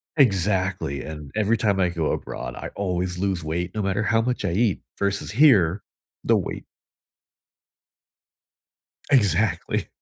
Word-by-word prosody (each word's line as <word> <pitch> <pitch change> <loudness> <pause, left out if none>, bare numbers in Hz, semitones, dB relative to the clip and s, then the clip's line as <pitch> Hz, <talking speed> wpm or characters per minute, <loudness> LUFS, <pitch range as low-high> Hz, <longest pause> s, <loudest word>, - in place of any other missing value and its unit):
Exactly, 95 - +1
and 75 -3 -8
every 110 +2 +2
time 100 -3 +1
I 90 -2 +3
go 85 -3 -1
abroad, - - -5
I - - -6
always 90 -2 -2
lose 95 -2 -1
weight 85 +3 -3
no 110 - -2
matter 100 +2 0
how 115 +2 +2
much 125 -3 -2
I 95 - 0
eat 100 +2 +1 0.2
versus 100 -1 -1
here, 105 - +4 0.4
the - - +3
weight - - -4 2.5
Exactly. 100 - +2
95 Hz, 130 wpm, -24 LUFS, 90-105 Hz, 2.5 s, here